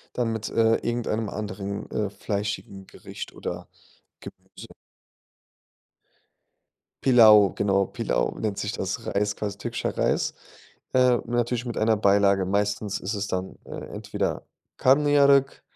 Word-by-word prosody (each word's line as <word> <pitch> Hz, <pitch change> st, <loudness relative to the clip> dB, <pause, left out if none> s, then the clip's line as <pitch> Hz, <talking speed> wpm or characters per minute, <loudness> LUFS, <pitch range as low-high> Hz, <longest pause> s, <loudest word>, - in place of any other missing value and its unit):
Dann 120 Hz, -2 st, 0 dB
mit, 110 Hz, -1 st, -4 dB
äh, 115 Hz, 0 st, +3 dB
irgendeinem 115 Hz, -2 st, -2 dB
anderen, 100 Hz, -1 st, -5 dB
äh, 105 Hz, -2 st, -2 dB
fleischigen 100 Hz, -1 st, -4 dB
Gericht -, -, -9 dB
oder -, -, -6 dB, 0.5 s
Gemüse. -, -, -12 dB, 2.4 s
Pilaw, 110 Hz, -6 st, +7 dB
genau, 100 Hz, -1 st, +1 dB
Pilaw -, -, -2 dB
nennt 105 Hz, -3 st, -2 dB
sich 105 Hz, -, -2 dB
das. 95 Hz, -1 st, -4 dB
Reis, 105 Hz, +1 st, 0 dB
quasi 100 Hz, -1 st, -4 dB
türkischer -, -, -4 dB
Reis, -, -, 0 dB, 0.6 s
äh, 125 Hz, -1 st, +4 dB
natürlich 120 Hz, 0 st, -1 dB
mit 120 Hz, -2 st, -4 dB
einer 110 Hz, 0 st, +3 dB
Beilage. 100 Hz, -1 st, +3 dB
Meistens 100 Hz, +1 st, -1 dB
ist 100 Hz, +4 st, -3 dB
es 100 Hz, 0 st, -3 dB
dann, 95 Hz, 0 st, -4 dB
äh, -, -, -15 dB, 0.2 s
entweder -, -, -3 dB, 0.3 s
Karnıyarık. 140 Hz, 0 st, +4 dB
105 Hz, 120 wpm, -25 LUFS, 100-120 Hz, 2.4 s, Pilaw